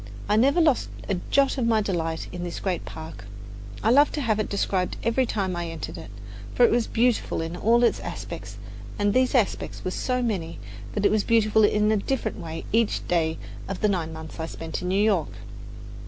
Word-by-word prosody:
I 205 - +3
never 275 +9 +4
lost 310 -6 +3 0.2
a 190 - 0
jot 275 -1 +3
of 235 - +1
my 225 -1 +4
delight 165 -6 -2
in 175 0 -5
this 175 -1 -4
great 185 -3 -2
park. 160 -10 -9 0.6
I 225 - +4
loved 285 +4 +5
to 295 - -2
have 220 -5 +1
it 215 - -1
described 190 -2 -1
every 235 +2 +2
time 190 -5 -1
I 175 0 -3
entered 165 -2 -6
it; - - -9 0.5
for 245 - +6
it - - +3
was 235 -1 +2
beautiful 240 0 +1
in 165 +1 -3
all 235 +6 +3
its 235 - +3
aspects, - - -7 0.4
and 205 0 +2
these 255 +2 +2
aspects 230 -6 0
were 185 - -1
so 250 +5 -1
many 185 -8 -2 0.4
that 205 -1 -1
it - - +5
was 215 -1 +2
beautiful 220 -1 +3
in 210 +1 +3
a 215 - +3
different 225 +1 -2
way 165 0 -6
each 225 -1 +1
day 160 -2 +1 0.3
of 195 -1 -5
the 210 - +3
nine 170 -5 -1
months 160 0 -9
I 160 - -2
spent 165 0 -6
in 180 - -3
New 195 +3 +2
York. 195 -8 +2
205 Hz, 210 wpm, -25 LUFS, 175-230 Hz, 0.6 s, for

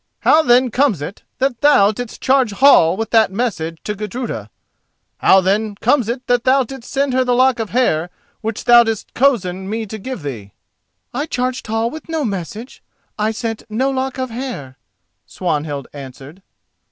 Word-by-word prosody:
"How 315 - +5
then 250 -2 +3
comes 250 - +2
it 180 +7 -7 0.2
that 260 -3 -1
thou 280 -9 +5
didst 240 +1 -7
charge 260 -5 +2
Hall 195 -8 +5
with 225 0 -4
that 220 -4 +4
message 190 -7 -2
to 210 - -3
Gudruda? 210 - -5 0.7
How 190 - +5
then 205 +3 0
comes 240 +2 +1
it 250 +2 -4
that 245 -1 +1
thou 265 +1 +4
didst 255 0 -10
send 275 -1 0
her 260 0 +3
the 250 -1 +1
lock 255 -1 +3
of 220 -2 -3
hair 175 -9 +1 0.3
which 225 -1 -4
thou 240 0 +7
didst 225 -3 -3
cozen 190 -8 +1
me 225 +1 -3
to 215 +1 -8
give 255 - -6
thee?" 110 -9 -7 0.6
"I 285 +5 -2
charged 255 -2 -2
Hall 225 +2 -1
with 315 +2 -10
no 320 -3 -1
message, 210 +4 -6 0.4
and 210 - +1
I - - +1
sent 225 0 -4
no 260 +6 0
lock 265 0 -3
of 255 -2 -3
hair," 225 - -6 0.5
Swanhild 150 -6 -3
answered. 140 +4 -11
225 Hz, 175 wpm, -18 LUFS, 195-255 Hz, 0.7 s, thou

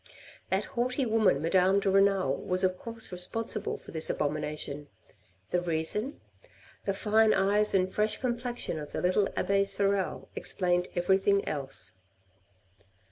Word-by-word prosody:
That 190 +2 +1
haughty 250 +2 0
woman, 215 - +2
Madame 185 +3 +3
de 200 - -3
Renal, 195 -8 +3
was 185 +1 0
of 185 -1 +2
course 230 -2 -5
responsible 180 +5 -1
for - - -13
this 160 -1 -1
abomination. 150 -1 -3 0.6
The 180 - +1
reason? 175 - -2 0.7
The 195 - -1
fine 220 +2 +3
eyes 205 +2 +2
and 185 0 +1
fresh 210 0 +1
complexion 240 -8 -3
of 150 - -8
the - - -2
little 185 +3 +2
abbe 195 +2 +2
Sorel 195 -1 0
explained 180 -1 0
everything 195 +3 +2
else. 135 -9 -1
195 Hz, 135 wpm, -29 LUFS, 175-210 Hz, 0.7 s, Madame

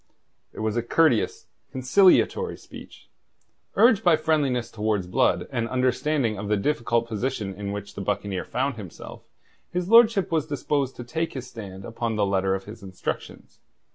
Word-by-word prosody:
It - - -8
was 110 0 -1
a 120 - +1
courteous, 120 -1 +2 0.3
conciliatory 190 - +3
speech. - - -13 0.7
Urged 230 -4 +5
by 175 -3 +6
friendliness 150 -6 0
towards 105 -3 -1
Blood 90 - +1
and 115 0 -2
understanding 130 -2 0
of 105 - -5
the 105 0 +2
difficult 120 -1 0
position 110 -3 -3
in 100 +1 -5
which 100 0 -6
the - - -6
buccaneer 100 -1 -2
found 130 0 -2
himself, 95 -6 -10 0.5
his 180 +1 -2
lordship 225 -5 +5
was 155 -2 0
disposed 145 -2 -1
to 120 - -7
take 160 +7 -3
his 130 -2 -6
stand 100 -6 -9
upon 115 0 -3
the 105 -1 +2
letter 95 -1 +1
of 95 - -5
his 110 +2 -10
instructions. 95 -1 -6
120 Hz, 160 wpm, -25 LUFS, 105-150 Hz, 0.7 s, by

